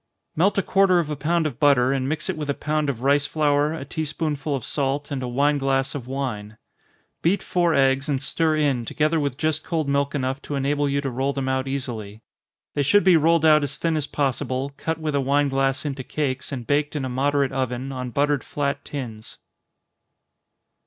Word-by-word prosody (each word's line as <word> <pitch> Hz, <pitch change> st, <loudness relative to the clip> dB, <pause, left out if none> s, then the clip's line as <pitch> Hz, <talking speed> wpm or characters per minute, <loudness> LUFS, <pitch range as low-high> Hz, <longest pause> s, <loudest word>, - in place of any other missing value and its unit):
_ -, -, -55 dB, 0.3 s
Melt 190 Hz, +6 st, +2 dB
a 195 Hz, -, +2 dB
quarter 195 Hz, -2 st, +4 dB
of 160 Hz, -3 st, 0 dB
a -, -, -1 dB
pound 160 Hz, +4 st, 0 dB
of 140 Hz, -6 st, -3 dB
butter, 135 Hz, -3 st, +4 dB
and 135 Hz, -1 st, -1 dB
mix 155 Hz, -, -2 dB
it -, -, -1 dB
with 150 Hz, -2 st, -5 dB
a 140 Hz, -, +1 dB
pound 155 Hz, -1 st, -1 dB
of 125 Hz, -3 st, -4 dB
rice 140 Hz, +1 st, +3 dB
flour, 150 Hz, -1 st, +2 dB
a 160 Hz, -4 st, -5 dB
tea 155 Hz, +3 st, -3 dB
spoonful 150 Hz, -1 st, -2 dB
of 130 Hz, -, -5 dB
salt, 140 Hz, +1 st, -1 dB
and 135 Hz, -2 st, -2 dB
a 125 Hz, -, -3 dB
wine 140 Hz, +4 st, +2 dB
glass 135 Hz, -1 st, 0 dB
of 130 Hz, -4 st, -6 dB
wine. 115 Hz, -6 st, -4 dB, 0.6 s
Beat 185 Hz, +4 st, +1 dB
four 175 Hz, -2 st, +1 dB
eggs, 135 Hz, +1 st, +2 dB
and 140 Hz, -2 st, +1 dB
stir 155 Hz, +3 st, +1 dB
in, 140 Hz, -5 st, +1 dB
together 155 Hz, +7 st, 0 dB
with 140 Hz, -3 st, -2 dB
just 155 Hz, 0 st, 0 dB
cold 160 Hz, -4 st, -2 dB
milk 140 Hz, +1 st, 0 dB
enough 135 Hz, 0 st, -2 dB
to 145 Hz, -, -5 dB
enable 145 Hz, +1 st, 0 dB
you 140 Hz, 0 st, 0 dB
to 135 Hz, -2 st, -3 dB
roll 135 Hz, +3 st, -1 dB
them 135 Hz, -1 st, -3 dB
out 130 Hz, 0 st, 0 dB
easily. 115 Hz, -6 st, -5 dB, 0.5 s
They 145 Hz, -, 0 dB
should 205 Hz, +9 st, +4 dB
be 185 Hz, -2 st, +6 dB
rolled 165 Hz, +1 st, +3 dB
out 155 Hz, -1 st, +6 dB
as 140 Hz, 0 st, 0 dB
thin 165 Hz, -1 st, 0 dB
as 150 Hz, -2 st, -1 dB
possible, 135 Hz, -1 st, -1 dB
cut 160 Hz, +2 st, -3 dB
with 155 Hz, -2 st, -3 dB
a 140 Hz, -, +2 dB
wine 140 Hz, +2 st, +2 dB
glass 135 Hz, +1 st, 0 dB
into 135 Hz, -2 st, -3 dB
cakes, 130 Hz, -1 st, -3 dB
and 125 Hz, -4 st, -5 dB
baked 145 Hz, +2 st, 0 dB
in 140 Hz, -3 st, -2 dB
a -, -, -2 dB
moderate 140 Hz, +2 st, +1 dB
oven, 130 Hz, 0 st, -2 dB
on 125 Hz, -1 st, -4 dB
buttered 145 Hz, +2 st, +1 dB
flat 140 Hz, -1 st, -2 dB
tins. 115 Hz, -7 st, -7 dB
140 Hz, 215 wpm, -23 LUFS, 135-150 Hz, 0.6 s, be